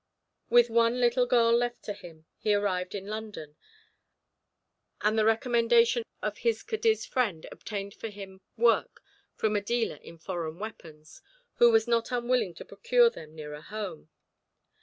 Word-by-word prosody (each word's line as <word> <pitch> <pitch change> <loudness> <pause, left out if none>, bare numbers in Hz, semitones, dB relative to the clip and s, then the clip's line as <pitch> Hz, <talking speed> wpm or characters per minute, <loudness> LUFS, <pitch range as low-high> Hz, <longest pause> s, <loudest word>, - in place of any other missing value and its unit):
With 240 0 +6
the 235 - -12
one 235 +1 +3
little 245 +1 +3
girl 235 -1 +4
left 240 0 -1
to 205 - -4
him, 170 -5 -14
he 210 -1 +2
arrived 190 -2 -1
in 195 -1 -5
London, 210 -8 -7 1.5
and 210 +1 +2
the 220 - +3
recommendation 235 +1 +3 0.2
of 210 0 -3
his 230 -1 0
Cadiz 445 -1 0
friend 210 -11 -1
obtained 200 -2 -6
for 225 - -7
him 195 -2 -11 0.2
work 230 0 +2 0.3
from 215 -1 0
a 205 - +1
dealer 235 +2 -1
in 170 - -13
foreign 165 -2 -5
weapons, 160 -7 -10 0.4
who 240 - +7
was 225 0 +3
not 235 +1 +1
unwilling 240 -6 0
to - - -10
procure 480 0 +3
them 155 - -12
nearer 150 -1 -8
home. 185 -4 -7
220 Hz, 155 wpm, -28 LUFS, 190-235 Hz, 1.5 s, who